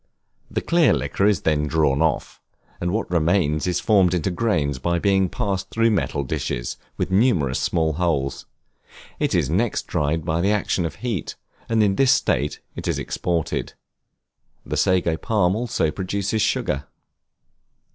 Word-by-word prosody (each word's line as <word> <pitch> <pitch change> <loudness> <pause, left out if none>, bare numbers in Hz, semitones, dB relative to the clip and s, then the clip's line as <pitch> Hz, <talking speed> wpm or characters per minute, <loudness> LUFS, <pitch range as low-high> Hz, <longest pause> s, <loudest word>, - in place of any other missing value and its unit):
The - - -2
clear 170 -3 +3
liquor 100 - 0
is 105 -7 +2
then 75 -1 +1
drawn 75 -2 +2
off, 80 -4 -1 0.4
and 85 - -1
what 110 +5 -1
remains 85 -2 +1
is 90 - 0
formed 95 -4 +3
into 90 +2 -1
grains 80 - 0
by 85 +6 0
being 95 0 +2
passed 95 0 -2
through 115 0 +2
metal 75 -8 0
dishes, - - -3 0.2
with - - -2
numerous 95 - +2
small 80 -2 0
holes; 75 -5 -1 0.7
it - - +1
is - - +2
next 100 - 0
dried 80 0 -1
by 80 0 0
the 95 - +2
action 100 -4 0
of 75 - -9
heat, 115 -8 -3 0.3
and 110 -1 +3
in 100 -2 +1
this 135 -1 +4
state 75 - +1
it - - -6
is - - 0
exported. 85 -3 -2 0.9
The - - -3
Sago 90 -4 +2
Palm 100 -4 +1
also 110 -9 0
produces 100 +5 -2
sugar. 70 -7 0
90 Hz, 155 wpm, -22 LUFS, 80-100 Hz, 0.9 s, this